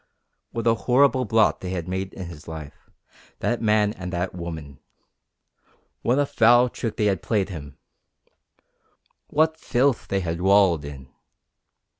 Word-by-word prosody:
What 115 -1 -4
a 115 - +5
horrible 130 +2 +3
blot 110 0 +2
they 90 - -5
had 90 -2 -4
made 95 +1 -4
in 95 - -6
his 85 -3 -11
life 80 -3 -9 0.5
that 120 - -1
man 105 -1 +2
and 90 -5 -7
that 90 +1 -2
woman! 80 -5 -7 1.2
What 125 +3 +1
a 145 - +3
foul 120 0 +4
trick 115 -2 -4
they 105 - +1
had 95 -4 +1
played 100 -4 0
him! 75 -6 -9 1.5
What 160 +1 +1
filth 130 -1 +1
they 95 0 -1
had 85 -1 -3
wallowed 95 -5 +4
in! 70 -3 -9
100 Hz, 145 wpm, -24 LUFS, 85-120 Hz, 1.5 s, a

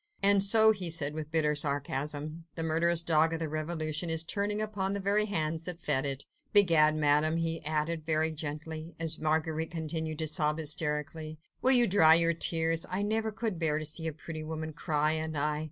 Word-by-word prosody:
"And 200 0 +4
so," 220 +2 +5
he 190 -5 -2
said 155 -3 0
with 155 -1 -6
bitter 155 -2 +1
sarcasm, 145 +2 -3
"the 165 - -4
murderous 165 +1 +1
dog 160 -1 +2
of - - -5
the 165 - -3
revolution 155 +1 -3
is 160 0 +2
turning 205 +4 -2
upon 205 -3 -2
the 200 - -3
very 200 +2 +1
hands 160 -5 -3
that 180 -2 -4
fed 135 -4 0
it?... 135 0 -3 0.3
Begad, 165 -7 +5
Madame," 150 +1 +1
he 165 0 -3
added 155 +1 -2
very 160 0 0
gently, 155 +1 -6
as 165 -1 -1
Marguerite 160 +1 -1
continued 160 -1 -4
to 160 0 -3
sob 150 0 0
hysterically, 155 0 -3 0.2
"will 260 - +9
you 245 -2 +10
dry 160 -6 +5
your 170 0 +2
tears?... 165 0 0
I 185 +2 -2
never 220 +1 -1
could 210 -3 -4
bear 155 -2 +1
to 155 - -4
see 160 +2 -3
a - - -2
pretty 155 +1 -8
woman 160 0 -6
cry, 150 -1 0
and 160 -1 -3
I 150 +1 -1
160 Hz, 195 wpm, -29 LUFS, 155-170 Hz, 0.3 s, you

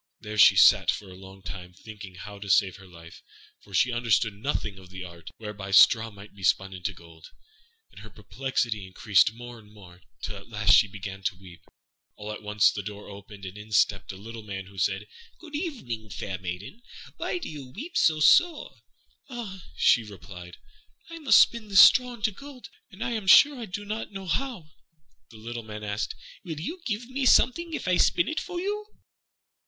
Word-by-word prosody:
There 105 0 -6
she - - +8
sat - - +6
for 100 -3 -2
a - - -11
long 95 +1 -14
time, 90 -1 -8
thinking 100 -2 -11
how 100 +3 -10
to 100 0 -8
save 95 0 +3
her 95 -1 -15
life; 85 -2 -14 0.4
for 100 - -20
she 95 +7 +2
understood 115 -2 +1
nothing 100 -3 -4
of 95 -1 -15
the 95 0 -8
art 85 -2 -11
whereby 105 -3 -7
straw 110 +3 +6
might 100 0 -14
be 100 - -15
spun 95 +1 +1
into 90 +1 -4
gold; 85 -3 -15 0.6
and - - -14
her - - -12
perplexity 120 -6 -3
increased 95 +2 +3
more 120 0 -10
and 105 -1 -19
more, 95 -4 -16 0.2
till - - -5
at - - -14
last - - +3
she - - +6
began 100 0 -8
to 100 -1 0
weep. 90 -3 -15 0.5
All 105 +1 -7
at 105 - -7
once 105 -1 +3
the 100 - -5
door 105 +1 -9
opened, 100 0 -11
and 95 +1 -8
in 105 +1 -11
stepped 105 - +2
a 95 - -10
little 115 +3 -9
Man, 95 -2 -7
who 95 0 -11
said, 95 +2 0 0.3
"Good 320 -3 -14
evening, 130 - -5
fair 95 -2 -5
maiden; 95 - -7 0.4
why - - -2
do 350 - -6
you 145 -4 -8
weep 290 - -9
so 155 -1 +3
sore?" 325 - +4 0.5
"Ah," 210 -8 -7
she 120 - +4
replied, 90 -4 -11 0.5
"I 330 - -8
must 300 - +6
spin 235 -2 +1
this 195 -2 +4
straw 250 -1 +6
into 220 -1 -1
gold, 275 +4 -12 0.2
and 205 +3 -7
I - - -2
am 220 -4 -4
sure 280 +7 +7
I 230 - -6
do 205 +2 -6
not 215 +1 -5
know 195 -1 -8
how." 190 - -3 0.6
The 110 - -14
little 120 +2 -6
Man 105 -1 -9
asked, 105 +1 -3 0.3
"What 170 -7 -6
will - - -6
you 345 - -6
give 225 +1 -3
me 260 +1 -1 0.5
if - - -6
I 180 -1 +3
spin 345 - +3
it 315 - -2
for 355 -2 -5
you?" 415 +3 -3
105 Hz, 200 wpm, -26 LUFS, -, 0.6 s, she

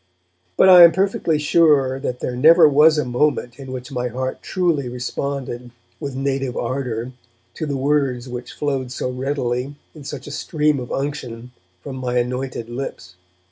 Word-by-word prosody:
But - - +6
I 180 -2 +10
am 170 -1 +8
perfectly 190 -4 +1
sure 150 -4 +3
that 125 -2 -4
there 125 - -3
never 160 +5 +7
was 150 +2 +5
a 150 - 0
moment 125 0 -1
in 135 -1 -8
which 130 +1 -7
my 125 -2 -2
heart 130 +2 -4
truly 170 -8 -1
responded, 125 0 -4 0.3
with 140 -3 -5
native 135 -1 -2
ardour, 120 -1 -3 0.4
to 155 - -4
the 140 -1 -2
words 135 -3 0
which 125 0 -7
flowed 135 -4 -2
so 125 0 -3
readily, 130 0 -2 0.2
in 150 - -12
such 140 -1 -7
a 145 - -8
stream 150 -1 0
of 125 - -7
unction, 125 -4 -5 0.3
from 130 - -7
my 125 -1 -2
anointed 125 -1 -2
lips. 120 -7 -7
135 Hz, 165 wpm, -20 LUFS, 125-150 Hz, 0.4 s, I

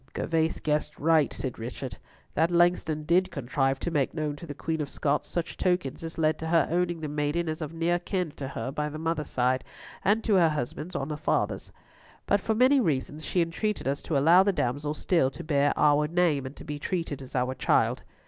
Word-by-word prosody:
'" - - -37
"Gervas 160 -1 0
guessed 150 0 -1
right," 160 -1 +3
said 130 -4 -5
Richard. 125 +3 -6 0.4
"That 165 +2 +2
Langston 175 -3 +2
did 180 +4 +3
contrive 135 -2 0
to 170 - -2
make 145 -3 0
known 150 -2 -2
to 170 - -9
the 145 - -6
Queen 160 +1 -2
of 145 - -3
Scots 145 0 -1
such 170 -1 -4
tokens 175 -6 0
as 165 0 -6
led 155 -1 +1
to 160 - -4
her 165 0 +3
owning 175 -1 0
the 155 - -3
maiden 150 +3 -1
as 155 +1 -3
of 155 - -4
near 170 +1 0
kin 180 -2 -2
to 135 - -4
her 130 -1 -4
by 150 +1 -2
the 150 - -7
mother's 160 -1 -2
side, 130 +1 +1 0.4
and 215 +3 +2
to 220 - +1
her 170 -3 +5
husband 150 +4 -4
on 135 - -2
the 150 - -3
father's; - - -1 0.5
but 200 0 +2
for 220 - 0
many 260 +4 +5
reasons 155 - -1
she 175 +3 +1
entreated 185 +2 -2
us 140 +1 -1
to 155 - -1
allow 165 +7 +6
the 200 +1 +3
damsel 145 -1 -1
still 165 -5 +2
to - - -9
bear 145 -2 +2
our 150 0 +4
name, 160 -5 +1
and 135 - -10
be 150 -1 -5
treated 165 -4 -3
as 130 - -10
our 125 0 +1
child." 130 - +1
155 Hz, 215 wpm, -27 LUFS, 145-170 Hz, 0.5 s, allow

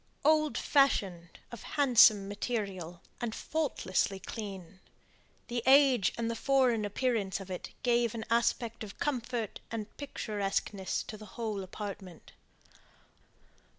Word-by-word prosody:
Old 305 -1 +3
fashioned, 195 - +1
of 235 - -8
handsome 240 -8 +5
material, 195 -5 -4 0.2
and 235 -2 -2
faultlessly 200 -11 -1
clean, 195 -3 -7 0.7
the 240 -1 -2
age 270 -6 +6
and 230 -1 -1
the 230 - -2
foreign 250 -3 +2
appearance 205 -3 -1
of 195 -1 -9
it 180 - -5
gave 235 -2 +2
an 220 -1 -4
aspect 230 -1 +1
of 200 -2 -9
comfort 245 -5 -2
and 220 -2 -6
picturesqueness 205 -7 -2
to 215 - -8
the 215 0 -11
whole 215 -4 -2
apartment. 190 -2 -8
220 Hz, 120 wpm, -31 LUFS, 195-245 Hz, 0.7 s, age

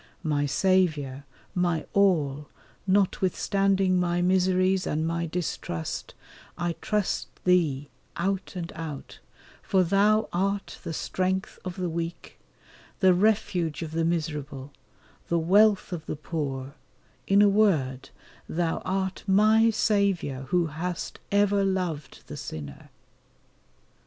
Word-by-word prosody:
My 145 -3 0
Saviour, 150 -4 +1 0.3
my 175 -3 0
all, 150 -8 +2 0.4
notwithstanding 195 0 +2
my 175 0 +1
miseries, 185 +1 +2
and 155 +2 -1
my 170 +1 -1
distrust, 155 - -4 0.4
I 175 -1 -1
trust 210 -2 -1 0.2
Thee 155 -6 +2 0.3
out 190 +2 -2
and 175 -2 -5
out, 155 -4 -7 0.4
for 190 -1 +2
Thou 205 +4 +3
art 195 +3 -1
the - - -4
strength 185 +3 -2
of 180 -1 -5
the 185 -2 -2
weak, 170 0 -5 0.6
the 190 -2 +6
refuge 180 -6 +1
of 160 - -6
the 165 +1 0
miserable, 150 -4 -3 0.6
the 170 - +1
wealth 200 +4 +4
of 160 -3 -6
the - - -3
poor, 140 -3 -4 0.5
in 200 +1 +5
a - - +6
word 165 -12 +2 0.4
Thou 165 0 -1
art 190 0 -2
my 215 +3 +5
Saviour, 200 -11 0
who 175 +5 +2
hast 165 +3 -4
ever 200 0 +3
loved 180 -7 -2
the - - -8
sinner. 70 -3 -8
180 Hz, 115 wpm, -27 LUFS, 155-195 Hz, 0.6 s, the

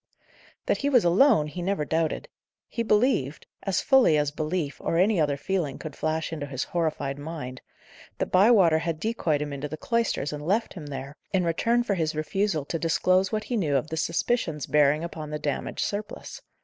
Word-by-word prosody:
That - - +1
he 285 - 0
was 250 -8 +4
alone, 190 - +5
he 165 +4 -6
never 180 -4 -1
doubted. 160 +1 -1 0.4
He 230 - -3
believed 210 - +1 0.2
as 195 -2 0
fully 265 - +5
as 145 -1 +1
belief, 155 -1 -3
or 165 - 0
any 190 0 +3
other 145 -2 +1
feeling 155 -2 -2
could 155 -3 -8
flash 155 +1 -2
into 145 -3 -4
his 130 -2 -3
horrified 150 -5 -2
mind 145 -4 -6 0.6
that - - -2
Bywater 185 -5 +5
had 165 -1 -3
decoyed 165 -9 0
him 145 -1 -5
into 140 +1 -4
the 155 +2 -6
cloisters 230 - -1
and 150 0 -6
left 205 +8 0
him 160 -6 -8
there, 140 +1 -7
in 190 -2 +2
return 230 +8 +1
for 215 - 0
his 160 -4 -1
refusal 160 0 -1
to 165 - -3
disclose 185 +3 +2
what 215 0 -1
he 245 - -3
knew 160 -10 +1
of 140 +4 0
the 160 - -3
suspicions 165 - 0
bearing 150 +1 +3
upon 160 -3 -6
the 150 - -3
damaged 145 -1 -2
surplice. 205 +1 -5
160 Hz, 190 wpm, -26 LUFS, 150-195 Hz, 0.6 s, alone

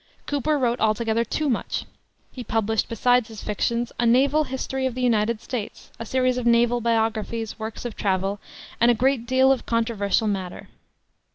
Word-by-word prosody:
Cooper 290 +1 0
wrote 245 -2 0
altogether 220 +1 +1
too 300 +6 -2
much; 245 - -2 0.5
he 250 - -7
published, 225 -1 0
besides 245 0 +2
his 220 -3 -10
fictions, 235 +3 -1
a 240 - +2
Naval 275 +6 +3
History 265 0 -2
of 250 - -5
the 255 - -3
United 225 -2 +2
States, 230 -5 -6
a 230 - -6
series 255 0 +1
of 240 - -2
naval 235 +1 +3
biographies, 225 -1 -1
works 220 +2 -6
of 235 - -4
travel, 195 0 -1 0.4
and 235 - +5
a 240 - +4
great 255 0 +1
deal 260 +1 +4
of 265 - -1
controversial 225 -2 0
matter. 190 -3 -4
235 Hz, 170 wpm, -24 LUFS, 220-255 Hz, 0.5 s, and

